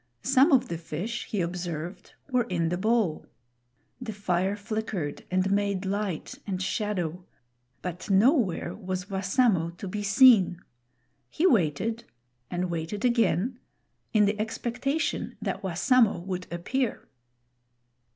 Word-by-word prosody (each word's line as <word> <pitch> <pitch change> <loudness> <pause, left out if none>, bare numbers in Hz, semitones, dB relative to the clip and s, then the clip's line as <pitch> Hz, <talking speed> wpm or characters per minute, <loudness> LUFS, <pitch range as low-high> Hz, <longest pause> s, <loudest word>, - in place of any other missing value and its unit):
Some 270 +4 +5
of 260 -2 +4
the 170 - -4
fish, 175 +9 -4
he 205 - -1
observed, 175 0 -5 0.2
were 250 -2 +2
in 170 -3 0
the 175 - -1
bowl. 215 -5 +1 0.7
The 230 -3 -4
fire 190 -1 0
flickered 210 -7 -4
and 185 +1 +1
made 200 -1 0
light 200 - -3
and 190 -2 -2
shadow; 185 -4 -2 0.6
but 180 +3 -5
nowhere 200 - +3
was 185 -1 -5
Wassamo 190 -2 +2
to 195 - -6
be 205 +3 -3
seen. 200 -4 +6 0.7
He 320 - 0
waited, 220 - +2 0.4
and 180 0 -2
waited 170 +7 -3
again, 235 0 +2 0.5
in 215 -3 +4
the 205 +1 0
expectation 245 +7 -2
that - - -3
Wassamo 205 +5 +3
would 185 -1 -4
appear. 225 +9 -2
200 Hz, 120 wpm, -27 LUFS, 180-230 Hz, 0.7 s, seen